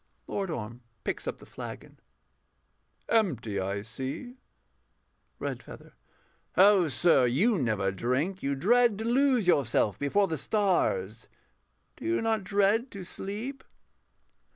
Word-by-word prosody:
LORD 195 Hz, -2 st, -3 dB
ORM 120 Hz, -5 st, -5 dB, 0.2 s
[picks -, -, -3 dB
up -, -, -3 dB
the -, -, -15 dB
flagon]. -, -, -9 dB, 1.1 s
Empty, 130 Hz, -, +1 dB
I 100 Hz, +2 st, -2 dB
see. 135 Hz, -, -6 dB, 1.0 s
REDFEATHER. -, -, -7 dB, 0.6 s
Oh 195 Hz, -2 st, +6 dB
sir, 145 Hz, -3 st, +4 dB
you 190 Hz, -, +2 dB
never 105 Hz, -7 st, 0 dB
drink. 130 Hz, -, -1 dB
You 140 Hz, 0 st, -1 dB
dread 230 Hz, -, +3 dB
to 220 Hz, -, -4 dB
lose 255 Hz, -2 st, +3 dB
yourself 120 Hz, -, +2 dB
before 195 Hz, +8 st, +2 dB
the 160 Hz, -4 st, -2 dB
stars 210 Hz, -, 0 dB, 0.7 s
Do -, -, -9 dB
you 340 Hz, +1 st, +1 dB
not 225 Hz, -2 st, 0 dB
dread 205 Hz, +6 st, +2 dB
to 195 Hz, -5 st, -8 dB
sleep? 215 Hz, +9 st, -6 dB
190 Hz, 120 wpm, -28 LUFS, -, 1.1 s, Oh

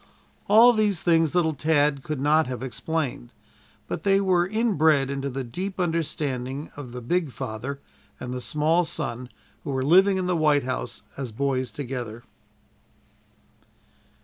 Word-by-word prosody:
All 230 Hz, +4 st, +7 dB
these 210 Hz, -6 st, +1 dB
things 165 Hz, -2 st, +3 dB
little 160 Hz, -3 st, +2 dB
Tad 145 Hz, -1 st, +1 dB
could 150 Hz, 0 st, -4 dB
not 150 Hz, +2 st, +3 dB
have 125 Hz, 0 st, -5 dB
explained, 130 Hz, -, -3 dB, 0.6 s
but -, -, -4 dB
they 195 Hz, +1 st, +3 dB
were 180 Hz, -3 st, +2 dB
inbred 160 Hz, -, +2 dB
into 140 Hz, 0 st, -3 dB
the 135 Hz, 0 st, -4 dB
deep 185 Hz, +11 st, -5 dB
understanding 145 Hz, -5 st, -2 dB
of 140 Hz, -4 st, -8 dB
the 125 Hz, 0 st, -7 dB
big 165 Hz, +3 st, 0 dB
father 120 Hz, +5 st, -5 dB, 0.4 s
and 125 Hz, 0 st, -5 dB
the 125 Hz, -, -4 dB
small 155 Hz, +6 st, +1 dB
son 125 Hz, -6 st, -4 dB, 0.3 s
who 155 Hz, -, -6 dB
were 130 Hz, -1 st, -1 dB
living 190 Hz, +5 st, +5 dB
in 185 Hz, -, -1 dB
the 180 Hz, 0 st, +1 dB
White 150 Hz, -3 st, +3 dB
House 130 Hz, 0 st, -4 dB
as 130 Hz, -4 st, -5 dB
boys 130 Hz, 0 st, -1 dB
together. 120 Hz, -3 st, -6 dB
145 Hz, 150 wpm, -25 LUFS, 130-175 Hz, 0.6 s, All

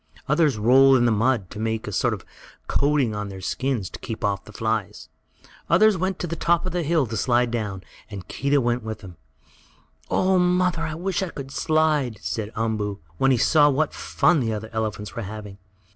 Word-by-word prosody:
Others 150 Hz, -4 st, +2 dB
rolled 130 Hz, +5 st, +6 dB
in 120 Hz, -, +2 dB
the 120 Hz, -, +3 dB
mud, 115 Hz, -2 st, +1 dB
to -, -, -8 dB
make 110 Hz, 0 st, -2 dB
a -, -, -3 dB
sort -, -, +1 dB
of -, -, -13 dB, 0.4 s
coating 140 Hz, -5 st, +1 dB
over 105 Hz, -1 st, -4 dB
their 95 Hz, -1 st, -8 dB
skins, 125 Hz, +1 st, -2 dB
to -, -, -8 dB
keep 115 Hz, -2 st, -5 dB
off 100 Hz, -1 st, -1 dB
the -, -, -12 dB
flies. 110 Hz, -1 st, -3 dB, 0.6 s
Others 210 Hz, +6 st, +5 dB
went 185 Hz, +1 st, -1 dB
to -, -, -3 dB
the 165 Hz, -1 st, -4 dB
top 170 Hz, +1 st, +1 dB
of 185 Hz, -, -2 dB
the 175 Hz, -, -1 dB
hill 160 Hz, -2 st, +1 dB
to 115 Hz, -1 st, -5 dB
slide 120 Hz, 0 st, +2 dB
down, 105 Hz, -5 st, -3 dB, 0.3 s
and 100 Hz, -4 st, -8 dB
Keedah 140 Hz, +1 st, +1 dB
went 120 Hz, 0 st, 0 dB
with 110 Hz, -1 st, -6 dB
them. 90 Hz, -4 st, -11 dB, 0.9 s
"Oh, 185 Hz, 0 st, +2 dB
mother! 180 Hz, -1 st, +2 dB
I 160 Hz, -1 st, -3 dB
wish 185 Hz, +3 st, -2 dB
I 190 Hz, -, -2 dB
could 135 Hz, -4 st, -8 dB
slide!" 155 Hz, -7 st, +1 dB
said 110 Hz, -1 st, -4 dB
Umboo, 110 Hz, -3 st, -2 dB, 0.2 s
when 135 Hz, -, +4 dB
he 130 Hz, -, +4 dB
saw 145 Hz, +5 st, +5 dB
what 145 Hz, +2 st, 0 dB
fun 175 Hz, -2 st, +2 dB
the 115 Hz, -4 st, -1 dB
other 110 Hz, +1 st, -6 dB
elephants 110 Hz, -2 st, -3 dB
were 115 Hz, -, -3 dB
having. 105 Hz, -1 st, -8 dB
120 Hz, 205 wpm, -24 LUFS, 110-155 Hz, 0.9 s, rolled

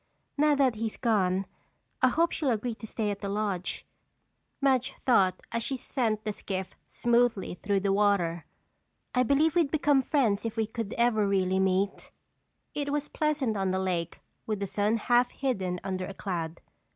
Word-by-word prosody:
"Now 300 Hz, 0 st, +4 dB
that 270 Hz, -3 st, +3 dB
he's 220 Hz, 0 st, -3 dB
gone 195 Hz, -5 st, +1 dB, 0.6 s
I -, -, +6 dB
hope 330 Hz, +6 st, +2 dB
she'll 295 Hz, -4 st, -1 dB
agree 235 Hz, +1 st, -1 dB
to 220 Hz, 0 st, -9 dB
stay 215 Hz, -1 st, -2 dB
at 200 Hz, -, -5 dB
the 200 Hz, -, -4 dB
lodge," 200 Hz, -3 st, -2 dB, 0.7 s
Madge 270 Hz, -1 st, +2 dB
thought 195 Hz, -8 st, +4 dB
as 230 Hz, -, -1 dB
she 265 Hz, +3 st, -2 dB
sent 225 Hz, -4 st, -1 dB
the 215 Hz, -, -2 dB
skiff 190 Hz, -2 st, -5 dB
smoothly 235 Hz, -6 st, +1 dB
through 200 Hz, -1 st, +1 dB
the 195 Hz, 0 st, +1 dB
water. 195 Hz, -5 st, +1 dB, 0.7 s
"I 250 Hz, -, +3 dB
believe 280 Hz, +5 st, +3 dB
we'd 335 Hz, -5 st, +3 dB
become 290 Hz, -2 st, +3 dB
friends 245 Hz, -7 st, +1 dB
if 225 Hz, 0 st, -4 dB
we 220 Hz, -, +2 dB
could 220 Hz, -1 st, -5 dB
ever 230 Hz, -3 st, +2 dB
really 190 Hz, -1 st, +1 dB
meet." 190 Hz, +1 st, 0 dB, 0.6 s
It 285 Hz, -1 st, -2 dB
was 295 Hz, 0 st, -2 dB
pleasant 295 Hz, -7 st, 0 dB
on 195 Hz, -1 st, 0 dB
the 185 Hz, -, 0 dB
lake 180 Hz, -3 st, -2 dB, 0.3 s
with 215 Hz, -2 st, -1 dB
the 200 Hz, -, -1 dB
sun 205 Hz, +3 st, +1 dB
half 245 Hz, +2 st, +3 dB
hidden 190 Hz, -11 st, -2 dB
under 185 Hz, -1 st, -3 dB
a 195 Hz, -, -8 dB
cloud. 170 Hz, -4 st, -4 dB
215 Hz, 175 wpm, -28 LUFS, 195-255 Hz, 0.7 s, I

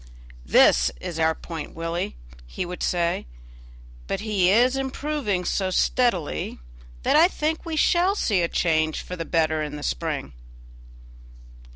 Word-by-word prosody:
"This -, -, +5 dB
is 165 Hz, -, -5 dB
our 160 Hz, 0 st, +2 dB
point, 165 Hz, -3 st, -8 dB
Willie," 165 Hz, -, -3 dB, 0.3 s
he 120 Hz, -, -4 dB
would 180 Hz, +1 st, -7 dB
say; 170 Hz, -, 0 dB, 0.8 s
"but -, -, -2 dB
he 205 Hz, -4 st, +2 dB
is 245 Hz, +6 st, +4 dB
improving 270 Hz, -7 st, -2 dB
so 190 Hz, +1 st, 0 dB
steadily 185 Hz, -, 0 dB, 0.5 s
that -, -, +2 dB
I 325 Hz, +3 st, +7 dB
think 320 Hz, -2 st, -2 dB
we 325 Hz, -, -2 dB
shall 355 Hz, +5 st, +3 dB
see 205 Hz, -, +1 dB
a 170 Hz, -, +1 dB
change 155 Hz, -2 st, 0 dB
for 180 Hz, -, -6 dB
the 165 Hz, -2 st, -5 dB
better 160 Hz, -2 st, +1 dB
in 150 Hz, -1 st, -4 dB
the 145 Hz, -, -7 dB
spring." 150 Hz, -, -3 dB
180 Hz, 145 wpm, -24 LUFS, 160-250 Hz, 0.8 s, I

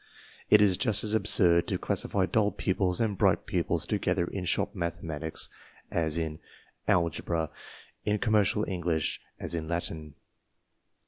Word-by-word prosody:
It 105 Hz, -, +7 dB
is 95 Hz, -3 st, +4 dB
just 110 Hz, -5 st, +2 dB
as 105 Hz, 0 st, 0 dB
absurd 85 Hz, -6 st, +4 dB
to -, -, -1 dB
classify 95 Hz, -2 st, 0 dB
dull 105 Hz, 0 st, +1 dB
pupils 95 Hz, -1 st, 0 dB
and 110 Hz, -3 st, 0 dB
bright -, -, +2 dB
pupils -, -, 0 dB
to -, -, -1 dB
gether 90 Hz, -1 st, 0 dB
in 90 Hz, +1 st, -5 dB
shop -, -, 0 dB
mathematics 80 Hz, -2 st, -2 dB, 0.4 s
as 80 Hz, -1 st, 0 dB
in 80 Hz, -2 st, -3 dB, 0.5 s
algebra, 85 Hz, -1 st, 0 dB, 0.5 s
in 105 Hz, 0 st, +1 dB
commercial 105 Hz, -1 st, +2 dB
English 85 Hz, -4 st, -1 dB, 0.2 s
as -, -, -4 dB
in 80 Hz, -2 st, -3 dB
Latin. 80 Hz, -3 st, -3 dB
90 Hz, 140 wpm, -28 LUFS, 80-105 Hz, 0.5 s, It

